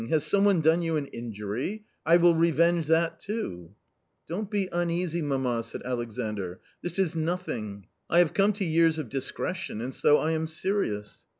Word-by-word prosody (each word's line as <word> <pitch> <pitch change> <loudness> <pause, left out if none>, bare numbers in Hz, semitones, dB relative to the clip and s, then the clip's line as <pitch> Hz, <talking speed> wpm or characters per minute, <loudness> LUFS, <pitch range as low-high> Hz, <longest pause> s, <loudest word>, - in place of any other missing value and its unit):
Has 155 -2 +2
someone 200 +1 +4
done 160 +3 +4
you 165 -2 0
an 145 - -2
injury? 115 - -5 0.2
I 170 +1 +7
will 175 0 +5
revenge 170 0 +3
that 165 +1 +2
too." 95 - -5 0.3
" - - -49
Don't 195 +5 -3
be 205 -3 0
uneasy, 170 0 0
mamma," 130 -5 0
said 115 - -7
Alexandr, 110 -6 -4
" - - -38
this 175 +1 -4
is 185 -4 +1
nothing! 125 - -3 0.2
I 170 - +3
have 175 -3 +5
come 200 +1 +4
to 200 -1 -2
years 165 -1 +3
of 150 -7 -4
discretion, 140 - -3
and 125 +3 -4
so 150 - +4
I 160 - 0
am 160 0 -1
serious." 160 - -2
160 Hz, 180 wpm, -27 LUFS, 125-175 Hz, 0.3 s, I